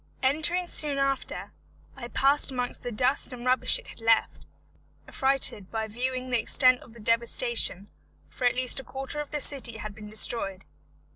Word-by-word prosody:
Entering 315 +7 0
soon 300 -4 +1
after, 275 -1 -3 0.4
I 250 -3 -8
passed 275 +4 +3
amongst 250 -2 -4
the 245 - -5
dust 255 +6 +2
and 245 -1 -9
rubbish 255 0 +3
it - - -13
had - - -13
left, 225 0 +1 0.6
affrighted 265 -7 +1
by 220 -1 -3
viewing 255 +3 -4
the 245 - +2
extent 255 +3 +3
of 230 - -16
the 235 - -15
devastation, 230 -3 0 0.4
for 250 - -5
at 245 - +2
least 255 +1 +2
a - - -8
quarter 270 +4 -4
of 295 - -5
the 295 - -4
city 260 -5 -2
had 215 -1 -7
been 210 0 -11
destroyed. 210 -3 +3
250 Hz, 170 wpm, -26 LUFS, 225-270 Hz, 0.6 s, passed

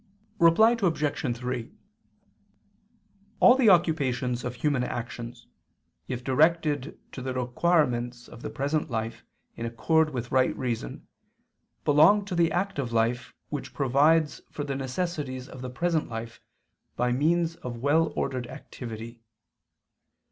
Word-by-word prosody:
Reply 220 +8 +6
Obj. 145 -8 0
3: 125 -1 -4 1.7
All 245 - +8
the 255 -4 +4
occupations 135 -9 +2
of 125 0 -4
human 135 0 0
actions, 120 0 -6 0.6
if 125 -1 -4
directed 150 +1 +1
to 130 - -7
the 130 0 -4
requirements 125 -2 0
of 120 - -12
the - - -5
present 145 +3 -1
life 115 -1 -4 0.3
in 115 - -4
accord 160 +7 +2
with 125 -4 -5
right 130 -1 +2
reason, 115 - -4 0.8
belong 160 +8 +5
to 195 - -5
the 170 -1 +2
active 175 -9 -2
life 115 +2 0
which 145 -2 -6
provides 150 +4 +3
for 145 - -5
the 140 -1 -3
necessities 135 -1 -3
of 130 - -10
the 130 - -5
present 165 +4 -1
life 115 0 -7 0.5
by 125 0 +1
means 165 +5 +1
of 120 -1 -6
well 145 +6 +2
ordered 125 -2 -2
activity. 115 -1 -9
130 Hz, 125 wpm, -27 LUFS, 120-160 Hz, 1.7 s, All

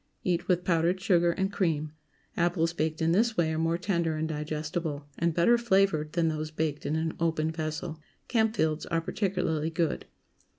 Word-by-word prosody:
Eat 175 -2 0
with 180 -1 +2
powdered 170 +1 +2
sugar 175 -3 +3
and 190 +3 -1
cream. 155 -6 0 0.4
Apples 170 -1 +1
baked 160 0 -1
in 165 - +3
this 220 +5 +2
way 160 -2 +2
are 160 - -1
more 165 +1 +1
tender 170 -4 0
and 155 +1 -1
digestible, 150 0 -3
and 170 -1 +1
better 235 +8 +4
flavored, 190 -9 +2
than 170 -1 +2
those 155 -1 -2
baked 155 -1 -2
in 155 - 0
an 160 0 -1
open 160 -1 +1
vessel. 160 0 -4 0.3
Campfields 220 -10 +1
are 165 -1 +1
particularly 175 -4 -1
good. 165 -1 -1
165 Hz, 170 wpm, -28 LUFS, 155-180 Hz, 0.4 s, better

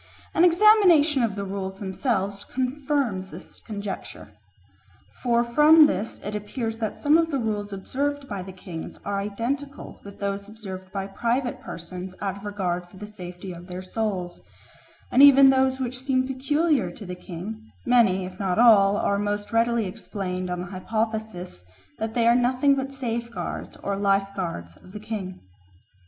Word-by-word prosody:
An 330 - +4
examination 345 - +6
of 225 -4 0
the 200 -1 -3
rules 190 0 -4
themselves 200 0 -2
confirms 260 -7 -1
this - - -11
conjecture. 205 -2 -7 0.9
For 235 -1 +3
from 300 +6 +7
this 225 -7 -2
it 205 - -4
appears 225 +2 -4
that 220 -2 -2
some 300 +2 +4
of 330 -1 +1
the 285 - 0
rules 210 -4 -2
observed 280 +8 -3
by 200 -5 -4
the 190 +1 -8
kings 180 -3 -8
are 200 0 -1
identical 245 +8 -4
with 200 0 -11
those 200 0 -3
observed 190 -4 -9
by 195 -1 -3
private 235 +6 -1
persons 180 +2 -7
out 195 -2 -2
of 200 - -11
regard 180 -4 -2
for 190 - -15
the 210 - -7
safety 185 -2 -8
of 175 +1 -11
their 180 0 -6
souls; 185 -3 -3 0.7
and 260 - +5
even 275 -1 +9
of - - +2
those 265 0 +2
which 250 -1 -3
seem 260 -1 +1
peculiar 275 - +1
to 205 +4 -9
the 180 - -5
king, 190 +5 -8
many, 225 -7 +4
if 185 0 -10
not 190 -3 0
all, 205 -4 +6
are 200 -1 +1
most 205 +1 -2
readily 230 -1 +2
explained 185 -2 -4
on 180 0 -2
the 180 - -6
hypothesis 215 - -3 0.4
that 220 0 -3
they 235 -1 +2
are 235 - +7
nothing 255 +3 +3
but 270 0 -2
safeguards 235 -3 -4
or 200 - -1
lifeguards 195 - -1
of 185 - -17
the 210 - -6
king. 205 -4 -6
210 Hz, 165 wpm, -25 LUFS, 190-255 Hz, 0.9 s, even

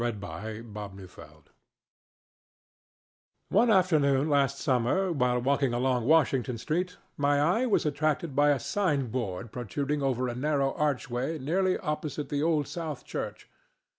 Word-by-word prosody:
HOWE'S 120 -2 -1 0.5
MASQUERADE 95 -8 -11 2.0
One 225 +5 +4
afternoon 155 -7 +3
last 140 -1 +2
summer, 135 +11 +1
while 125 -5 +1
walking 135 0 +1
along 125 -1 +1
Washington 135 -5 +3
street, 180 +9 -2 0.2
my 145 0 +2
eye 180 - +2
was 215 - +2
attracted 150 0 -1
by 145 +1 +4
a 145 -2 +3
sign 150 - 0
board 110 -3 -3
protruding 140 +5 -2
over 130 -2 0
a 120 - -3
narrow 140 +1 0
archway 140 0 -1
nearly 185 +7 +1
opposite 150 -4 -4
the 145 -1 -1
Old 155 -2 +1
South 160 -5 -5
Church. - - -5
140 Hz, 130 wpm, -28 LUFS, 125-155 Hz, 2.0 s, One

